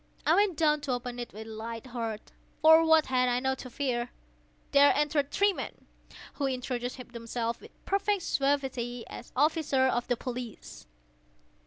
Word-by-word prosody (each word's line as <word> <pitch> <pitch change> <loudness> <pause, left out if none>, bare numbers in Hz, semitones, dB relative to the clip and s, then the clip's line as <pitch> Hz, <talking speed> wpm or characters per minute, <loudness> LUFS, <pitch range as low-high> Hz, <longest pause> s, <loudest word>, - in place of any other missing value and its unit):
I - - +5
went 400 -5 +3
down 300 -2 +3
to 270 -3 -2
open 245 0 -4
it 240 - -5
with 220 +2 -9
a - - -10
light 225 +2 -6
heart,—for 250 +7 +2
what 320 -1 +5
had 255 -1 +2
I 245 0 +1
now 265 +1 0
to 255 -1 -8
fear? 245 -2 -2 0.6
There 285 0 +7
entered 290 -1 +1
three 400 +6 +3
men, - - -7 0.5
who 280 - -1
introduced 250 -1 -3
themselves, 230 0 -3
with - - -17
perfect 400 -1 0
suavity, 265 -5 -1
as 245 - -10
officers 280 -2 +2
of 240 0 -1
the 245 - 0
police. 245 - -7
255 Hz, 160 wpm, -29 LUFS, 240-295 Hz, 0.6 s, There